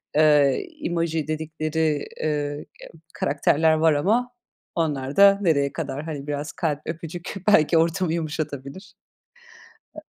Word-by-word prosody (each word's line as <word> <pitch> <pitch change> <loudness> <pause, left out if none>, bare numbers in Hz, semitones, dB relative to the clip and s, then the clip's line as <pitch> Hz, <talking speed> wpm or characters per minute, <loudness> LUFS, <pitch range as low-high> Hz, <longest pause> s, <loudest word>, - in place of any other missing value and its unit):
eee, 150 -3 +4 0.2
emoji 165 -3 -1
dedikleri, 155 -1 -1 0.2
ııı, 155 - +1 0.3
ya - - -13 0.2
karakterler 155 +2 +2
var 155 0 +3
ama 220 +12 +1 0.4
onlar 145 -5 -2
da 200 0 +7
nereye 140 -7 +1
kadar? 145 +3 -4
Hani, 145 -3 -6
biraz 145 0 -3
kalp, 150 -3 -2
öpücük 165 +1 -6
belki 170 -5 +5
ortamı 165 +1 +1
yumuşatabilir. 155 0 -5 1.0
E 310 - -8
155 Hz, 120 wpm, -24 LUFS, 145-165 Hz, 1.0 s, da